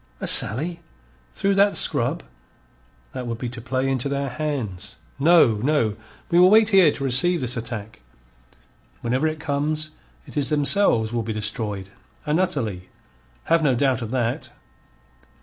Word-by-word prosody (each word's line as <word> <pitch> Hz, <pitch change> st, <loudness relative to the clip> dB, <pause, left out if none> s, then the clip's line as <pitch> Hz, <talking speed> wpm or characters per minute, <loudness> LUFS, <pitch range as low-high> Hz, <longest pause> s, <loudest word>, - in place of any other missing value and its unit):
"A -, -, -4 dB
sally? 160 Hz, -, +3 dB, 0.5 s
Through 200 Hz, 0 st, -1 dB
that 200 Hz, +1 st, +3 dB
scrub? -, -, +1 dB, 0.9 s
That 125 Hz, -, -6 dB
would 115 Hz, -1 st, -4 dB
be 120 Hz, +1 st, -5 dB
to 120 Hz, -1 st, -9 dB
play 130 Hz, +2 st, -2 dB
into 135 Hz, 0 st, -1 dB
their 140 Hz, 0 st, -2 dB
hands. 125 Hz, -, -5 dB, 0.2 s
No, 145 Hz, -7 st, +4 dB
no, 120 Hz, -3 st, 0 dB, 0.4 s
we 170 Hz, -, +4 dB
will 180 Hz, +1 st, +7 dB
wait 215 Hz, +1 st, +5 dB
here 190 Hz, -7 st, +5 dB
to 140 Hz, -, -7 dB
receive 140 Hz, +7 st, +2 dB
this 125 Hz, -3 st, -3 dB
attack. 110 Hz, -2 st, -7 dB, 1.0 s
Whenever 130 Hz, +6 st, 0 dB
it 155 Hz, 0 st, -4 dB
comes, 155 Hz, +1 st, -2 dB, 0.3 s
it -, -, -14 dB
is 145 Hz, -, +1 dB
themselves 145 Hz, -, +3 dB
will 120 Hz, -, -1 dB
be 110 Hz, 0 st, -4 dB
destroyed, 105 Hz, -2 st, -2 dB, 0.4 s
and 150 Hz, +3 st, 0 dB
utterly. 115 Hz, -, -3 dB, 0.5 s
Have 165 Hz, 0 st, +2 dB
no 135 Hz, -5 st, +2 dB
doubt 130 Hz, -1 st, 0 dB
of 115 Hz, -, -5 dB
that." 120 Hz, -1 st, -3 dB
135 Hz, 150 wpm, -22 LUFS, 115-155 Hz, 1.0 s, will